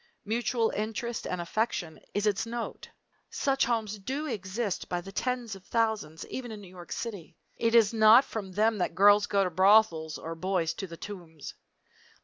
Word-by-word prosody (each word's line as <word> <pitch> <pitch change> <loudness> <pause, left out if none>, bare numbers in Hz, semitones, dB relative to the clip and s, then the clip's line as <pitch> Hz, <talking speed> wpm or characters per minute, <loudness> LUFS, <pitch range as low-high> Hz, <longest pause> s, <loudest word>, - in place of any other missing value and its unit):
Mutual 230 +1 0
interest 225 +2 -3
and 180 - -3
affection 175 -2 -2 0.2
is 205 +1 +1
its 210 +1 +1
note. 235 0 -5 0.4
Such 275 -2 +1
homes 220 -3 -1
do 270 +10 -3
exist 205 -4 -3
by 175 - -1
the 195 +3 -9
tens 245 +1 -2
of 190 - -13
thousands; 220 -10 -1
even 245 -3 -6
in 215 - -7
New 200 - -12
York 180 -1 -12
City. 205 -8 -6 0.2
It 230 0 +2
is 225 -2 +5
not 220 +4 +7
from 195 -4 -6
them 215 +2 +2
that 175 - -1
girls 205 +2 +6
go 200 -1 +2
to 180 - -1
brothels 185 -4 +4
or 165 - -6
boys 170 -1 -1
to 195 - -6
the 165 -1 -10
Tombs. 170 -7 -9
205 Hz, 175 wpm, -29 LUFS, 185-230 Hz, 0.4 s, not